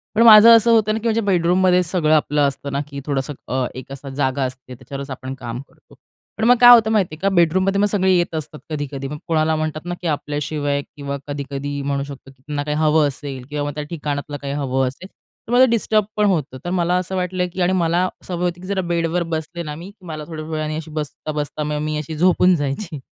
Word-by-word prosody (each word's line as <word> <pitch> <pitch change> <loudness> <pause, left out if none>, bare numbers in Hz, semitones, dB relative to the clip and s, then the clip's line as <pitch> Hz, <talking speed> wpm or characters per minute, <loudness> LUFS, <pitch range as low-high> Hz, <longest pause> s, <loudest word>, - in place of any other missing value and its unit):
पण 225 - +3
माझं 220 0 +10
असं 230 +1 +4
होतं 215 -2 +3
ना, 220 - -1
की 225 - -16
म्हणजे 225 0 +1
बेडरूममध्ये 180 -1 +3
सगळं 165 -3 +1
आपलं 150 0 +1
असतं 140 0 -5
ना, 140 - -1
की 140 -1 -7
थोडंसं 140 0 -2
अ, 130 0 0
एक 130 +1 -9
असं 135 0 -8
जागा 135 -1 0
असते, 130 0 -6
त्याच्यावरच 135 +3 -8
आपण 130 0 -6
काम 120 0 -5
करतो. - - -23 0.4
पण 220 - -3
मग 245 - +7
काय 245 0 +10
होतं 220 -2 +5
माहिती 190 -8 +1
आहे - - -19
का, 195 - +2
बेडरूममध्ये 185 +4 +3
मग - - +4
सगळे 190 -2 +2
येत 175 -1 0
असतात 155 -1 -5
कधी-कधी. 145 -3 -4
मग 150 +2 -6
कोणाला 160 -1 +2
म्हणतात 155 0 -3
ना, 175 - -3
की 175 - -3
आपल्याशिवाय 145 -1 -2
किंवा 140 0 -6
कधी-कधी 140 0 -4
म्हणू 140 0 -1
शकतो, 140 -1 -10
की 130 - -26
त्यांना 145 -1 -2
काही 150 0 -2
हवं 155 -1 +3
असेल 135 -2 -6
किंवा 145 -1 -2
मग 145 - -3
त्या 150 - -3
ठिकाणातलं 145 -2 -4
काही 140 0 -4
हवं 135 -2 0
असेल, 140 +9 -8 0.4
तर 235 - -7
मला 255 +1 +7
डिस्टर्ब 215 -2 +2
पण 210 - +3
होतं. 155 -9 0
तर - - -2
मला 175 0 +1
असं 185 +1 -3
वाटलं 180 0 -1
की 185 - -3
आणि 180 +1 +2
मला 175 +1 +2 0.2
सवय 180 -1 -3
होती, 175 0 -3
की 185 - -9
जरा 195 -1 0
बेडवर 170 0 0
बसले 160 +2 -4
ना 150 -2 -6
मी, 170 +5 -9
की 200 -3 -20
मला 155 -2 -6
थोड्या 155 -2 -6
वेळाने 155 -1 -3
अशी 160 0 -6
बसता-बसता 150 0 -4
मग 150 0 -2
मी 155 0 -2
अशी 155 +1 -5
झोपून 180 +2 +4
जायची. 145 +2 -3
155 Hz, 230 wpm, -20 LUFS, 145-180 Hz, 0.4 s, माझं